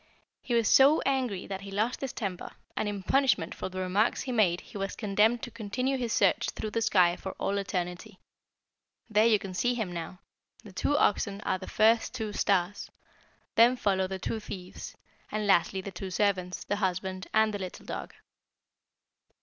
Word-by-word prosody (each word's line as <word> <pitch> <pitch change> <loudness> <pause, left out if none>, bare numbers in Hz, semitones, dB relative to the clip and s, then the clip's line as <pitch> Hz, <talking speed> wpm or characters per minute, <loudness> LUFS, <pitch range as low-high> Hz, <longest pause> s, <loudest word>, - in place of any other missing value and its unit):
He 240 - -1
was 230 -2 +3
so 280 +4 +6
angry 255 -8 -1
that 195 -1 -5
he 200 - -8
lost 215 +5 -1
his 270 -2 -3
temper, 190 -5 -5 0.2
and 215 - -1
in 200 -2 -5
punishment 260 -8 +2
for - - -5
the 185 - -9
remarks 190 +5 +1
he 260 - -4
made 190 -7 +2
he - - -17
was 195 0 -3
condemned 215 +2 +2
to - - -5
continue 250 +5 -2
his 245 -3 -2
search - - +2
through 215 - -5
the 230 - -1
sky 185 -6 +4
for 190 - -6
all 200 +1 -1
eternity. 185 +1 -4 0.9
There 215 +2 +5
you 220 -2 +5
can 195 -2 -7
see 245 +8 +1
him 220 -6 -2
now. 170 +1 -6 0.5
The 205 -4 -12
two 290 +10 +1
oxen 200 -3 +1
are 185 - -1
the 185 - -8
first 225 +3 +3
two 220 -4 -3
stars, 195 -1 0 0.6
then 235 +3 +6
follow 190 -5 +1
the 190 0 -4
two 220 +4 -3
thieves, 185 -3 -8 0.3
and 215 0 -1
lastly 190 0 +3
the 195 - -7
two 190 +1 -6
servants, 185 -2 0
the 205 - -2
husbandman, 185 -1 -2
and 220 0 +3
the 205 - -3
little 185 -2 -7
dog." - - -6
200 Hz, 185 wpm, -29 LUFS, 185-225 Hz, 0.9 s, so